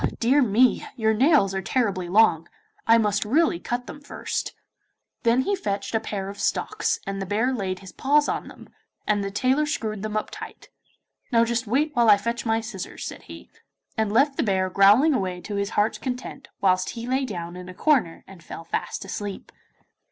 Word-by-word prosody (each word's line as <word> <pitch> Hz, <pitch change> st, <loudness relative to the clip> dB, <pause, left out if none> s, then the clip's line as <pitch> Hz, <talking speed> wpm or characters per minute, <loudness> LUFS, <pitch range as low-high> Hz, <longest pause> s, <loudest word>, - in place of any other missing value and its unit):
Dear 260 Hz, +5 st, +4 dB
me, 245 Hz, +1 st, +3 dB
your 220 Hz, -3 st, +2 dB
nails 250 Hz, -, +4 dB
are 190 Hz, -, -2 dB
terribly 195 Hz, -7 st, -1 dB
long; 175 Hz, -5 st, +4 dB, 0.4 s
I 230 Hz, 0 st, +7 dB
must 210 Hz, -2 st, +1 dB
really 275 Hz, -, +2 dB
cut 245 Hz, +6 st, -3 dB
them 290 Hz, -, -10 dB
first.' 285 Hz, -, -4 dB, 0.7 s
Then 235 Hz, +2 st, +3 dB
he 400 Hz, +9 st, 0 dB
fetched 200 Hz, -, -3 dB
a 225 Hz, -, +2 dB
pair 200 Hz, -3 st, -4 dB
of 200 Hz, 0 st, -8 dB
stocks, -, -, -1 dB
and 195 Hz, 0 st, -4 dB
the -, -, -2 dB
bear 225 Hz, +6 st, +1 dB
laid 190 Hz, -6 st, -2 dB
his 190 Hz, -, -11 dB
paws 295 Hz, +2 st, +2 dB
on -, -, -2 dB
them, -, -, -13 dB, 0.4 s
and 205 Hz, -1 st, +1 dB
the 195 Hz, -, -2 dB
tailor 260 Hz, +8 st, +1 dB
screwed 215 Hz, -8 st, -3 dB
them 215 Hz, 0 st, -3 dB
up 215 Hz, -, -3 dB
tight. -, -, -10 dB, 0.6 s
'Now 230 Hz, -1 st, +4 dB
just 235 Hz, 0 st, -2 dB
wait 285 Hz, +7 st, +1 dB
whilst 235 Hz, -2 st, +5 dB
I -, -, +3 dB
fetch 235 Hz, +3 st, -3 dB
my 225 Hz, 0 st, +1 dB
scissors,' 205 Hz, -4 st, -7 dB
said -, -, -8 dB
he, -, -, -12 dB, 0.4 s
and 220 Hz, -2 st, 0 dB
left 275 Hz, +5 st, +3 dB
the -, -, +2 dB
bear 190 Hz, -4 st, 0 dB
growling 210 Hz, +12 st, +5 dB
away 185 Hz, -7 st, -2 dB
to 210 Hz, -, -7 dB
his 200 Hz, 0 st, -1 dB
heart's 210 Hz, +2 st, +2 dB
content, 260 Hz, +1 st, -6 dB
whilst 185 Hz, -1 st, +2 dB
he 230 Hz, -, -5 dB
lay 260 Hz, +2 st, +1 dB
down 175 Hz, -8 st, -5 dB
in 180 Hz, 0 st, -9 dB
a -, -, -8 dB
corner 250 Hz, -, +1 dB
and 190 Hz, -3 st, -14 dB
fell 165 Hz, -, -8 dB
fast -, -, -4 dB
asleep. 205 Hz, -2 st, -6 dB
220 Hz, 195 wpm, -24 LUFS, 195-255 Hz, 0.7 s, I